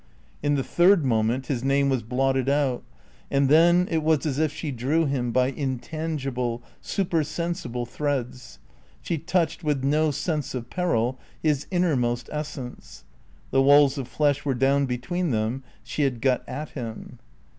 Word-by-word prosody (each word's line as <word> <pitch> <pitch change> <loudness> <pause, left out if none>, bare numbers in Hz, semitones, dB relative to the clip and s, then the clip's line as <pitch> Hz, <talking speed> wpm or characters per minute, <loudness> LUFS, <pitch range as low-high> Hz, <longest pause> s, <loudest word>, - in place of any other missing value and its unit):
In 145 0 +1
the 135 - 0
third 175 0 +4
moment 115 +2 +1
his 125 -2 -2
name 140 +1 +2
was 130 -3 +1
blotted 130 +3 0
out. 140 -3 +1 0.5
And 140 -1 +2
then 170 +4 +5
it 160 -1 +1
was 155 -1 +2
as 145 -2 -1
if 155 -2 +2
she 155 0 -5
drew 140 +7 +1
him 130 -4 -1
by 130 +1 +2
intangible, 135 -3 -3 0.2
supersensible 170 -6 -2
threads; 130 -2 -3 0.5
she 165 - -2
touched, 170 +1 0
with 145 -4 0
no 155 +3 +2
sense 150 -1 -2
of 120 -2 -6
peril, 130 -8 0 0.2
his 150 -2 +1
innermost 130 -10 0
essence; 150 -4 -7 0.5
the 135 - +4
walls 140 0 +5
of 130 - -4
flesh 145 -1 +1
were 135 -3 0
down 135 +2 +2
between 130 +9 -2
them; 115 +2 -1 0.2
she 115 +6 -4
had 135 -4 +1
got 130 0 +2
at 145 +4 -5
him. 115 -5 -7
140 Hz, 155 wpm, -25 LUFS, 125-155 Hz, 0.5 s, then